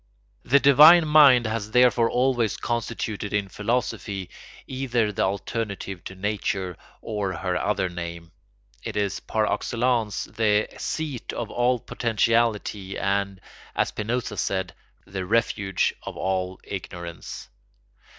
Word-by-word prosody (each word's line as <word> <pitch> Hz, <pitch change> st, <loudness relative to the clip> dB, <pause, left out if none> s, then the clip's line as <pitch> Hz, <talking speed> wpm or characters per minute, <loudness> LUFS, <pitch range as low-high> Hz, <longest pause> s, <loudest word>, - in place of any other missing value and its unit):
The 140 Hz, +3 st, +4 dB
divine 155 Hz, +5 st, +8 dB
mind 140 Hz, -6 st, +7 dB
has 110 Hz, -1 st, -2 dB
therefore 125 Hz, 0 st, +4 dB
always 125 Hz, -3 st, +1 dB
constituted 115 Hz, -3 st, -3 dB
in 100 Hz, -1 st, 0 dB
philosophy 105 Hz, -2 st, -2 dB, 0.3 s
either 125 Hz, -5 st, -1 dB
the -, -, -3 dB
alternative 100 Hz, -1 st, -3 dB
to 95 Hz, -, -7 dB
nature 95 Hz, -2 st, -2 dB, 0.3 s
or 105 Hz, -4 st, -3 dB
her 90 Hz, 0 st, -2 dB
other 95 Hz, 0 st, 0 dB
name: 85 Hz, -1 st, -7 dB, 0.5 s
it -, -, -5 dB
is 100 Hz, -2 st, -1 dB
par 110 Hz, -1 st, -1 dB
excellence 120 Hz, -3 st, 0 dB
the 105 Hz, -2 st, +1 dB
seat 150 Hz, -6 st, -4 dB
of 115 Hz, -2 st, -4 dB
all 125 Hz, +1 st, +2 dB
potentiality 115 Hz, -4 st, 0 dB
and, 100 Hz, -1 st, -1 dB, 0.4 s
as -, -, +1 dB
Spinoza 115 Hz, 0 st, -3 dB
said, 95 Hz, -2 st, -1 dB, 0.3 s
the 95 Hz, -1 st, -5 dB
refuge 100 Hz, -2 st, +1 dB
of -, -, -8 dB
all 95 Hz, -1 st, -2 dB
ignorance. 85 Hz, -3 st, -7 dB
105 Hz, 120 wpm, -25 LUFS, 95-120 Hz, 0.5 s, divine